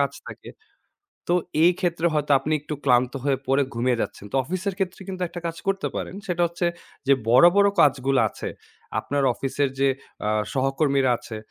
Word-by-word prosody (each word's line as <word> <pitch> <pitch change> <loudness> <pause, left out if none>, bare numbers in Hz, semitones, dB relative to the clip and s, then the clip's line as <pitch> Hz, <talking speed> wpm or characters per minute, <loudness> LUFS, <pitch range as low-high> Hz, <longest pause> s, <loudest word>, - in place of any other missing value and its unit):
কাজ - - +1 0.2
থাকে। - - -10 0.8
তো 175 - +3 0.3
এই 175 - +6
ক্ষেত্রে 170 -2 0
হয়তো 150 -1 +1
আপনি 145 +4 -3
একটু 150 +1 -5
ক্লান্ত 125 -1 +3
হয়ে 135 -2 +1
পড়ে 135 +2 +3
ঘুমিয়ে 120 0 0
যাচ্ছেন। 100 - -4
তো - - 0
অফিসের 185 +5 -3
ক্ষেত্রে 190 -1 -3
কিন্তু 185 -1 -5
একটা 175 - -7
কাজ 165 0 -4
করতে 195 0 0
পারেন। - - -4
সেটা 175 -1 0
হচ্ছে 170 +1 -2 0.4
যে 140 - +6 0.2
বড়, 125 +5 +7
বড় 200 0 +6
কাজগুলা 135 -3 +3
আছে, - - -6 0.5
আপনার 145 0 -1
অফিসের 140 +1 -1
যে 140 - +4 0.4
আ 105 - +1 0.2
সহকর্মীরা 135 0 +2
আছে, 110 - -8
145 Hz, 175 wpm, -24 LUFS, 135-175 Hz, 0.8 s, বড়